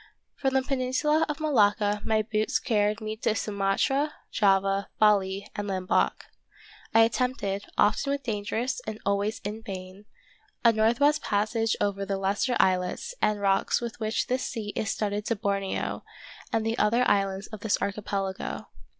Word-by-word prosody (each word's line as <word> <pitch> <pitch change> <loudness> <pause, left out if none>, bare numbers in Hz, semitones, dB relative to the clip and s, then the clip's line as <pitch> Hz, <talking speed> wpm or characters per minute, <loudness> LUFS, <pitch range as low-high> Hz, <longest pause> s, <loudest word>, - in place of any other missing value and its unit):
From 270 -1 -1
the 265 - +3
peninsula 270 +4 +1
of 300 +1 -3
Malacca 210 -8 +2
my 220 -1 +1
boots 215 0 0
car 210 -3 +1
ried 210 +2 -2
me 215 0 -3
to 215 - 0
Sumatra, 210 +9 0 0.2
Java, 195 -1 +2
Bali, 200 -2 +3
and 205 -1 -3
Lamboc. 185 -2 0 0.7
I 225 - +6
attempted, 225 -4 0
often 215 +7 +3
with 280 0 -2
danger 220 0 -2 0.2
and 215 0 -4
always 200 +2 0
in 210 +2 -5
vain, 190 0 -8 0.6
a 230 - +7
northwest 240 +8 +3
passage 215 +2 0
over 200 -1 0
the 195 0 -2
lesser 200 +6 0
islets 185 - +1
and 210 -1 +2
rocks 195 -1 +2
with 235 -1 -6
which 220 0 0
this 255 +1 -1
sea 215 -4 -4
is 215 - -1
studded 205 0 -1
to 230 - +1
Borneo 200 -2 -2 0.5
and 225 -1 0
the 225 +2 -1
other 235 +4 +3
islands 195 0 +1
of 215 - -8
this 210 0 +1
archipelago. 195 -1 -3
210 Hz, 155 wpm, -27 LUFS, 200-230 Hz, 0.7 s, a